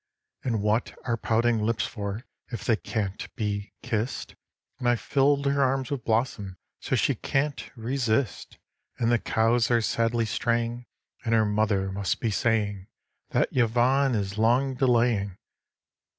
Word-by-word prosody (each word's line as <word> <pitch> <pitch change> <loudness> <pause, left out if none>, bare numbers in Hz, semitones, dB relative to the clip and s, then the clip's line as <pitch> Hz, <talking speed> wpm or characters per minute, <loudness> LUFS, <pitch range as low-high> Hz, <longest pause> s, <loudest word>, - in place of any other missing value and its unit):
And 115 -5 -1
what 105 +3 0
are 120 - +1
pouting 115 0 +1
lips 115 +1 0
for 105 +2 -5 0.2
if 120 - -6
they 115 - +4
can't 105 -3 -4
be 105 -1 -3
kissed? 110 +3 -2 0.5
And 120 - +1
I've 120 -1 +2
filled 140 0 +2
her 140 0 +2
arms 135 -1 +1
with 135 -5 -3
blossom 110 -5 -1 0.2
so - - -1
she - - +2
can't 145 +1 -2
resist; 120 -2 -1 0.4
And 115 0 +1
the 120 - +3
cows 115 +2 +2
are 120 -1 +4
sadly 115 +1 +1
straying, 120 +2 -1 0.4
and 115 -1 +2
her 110 -1 +4
mother 105 -2 +1
must 100 -1 -1
be 115 - 0
saying 105 -3 0 0.4
That - - 0
Yvonne 125 +2 +3
is 100 0 -2
long 125 +4 +3
delaying 120 -7 +2
115 Hz, 145 wpm, -27 LUFS, 105-125 Hz, 0.5 s, they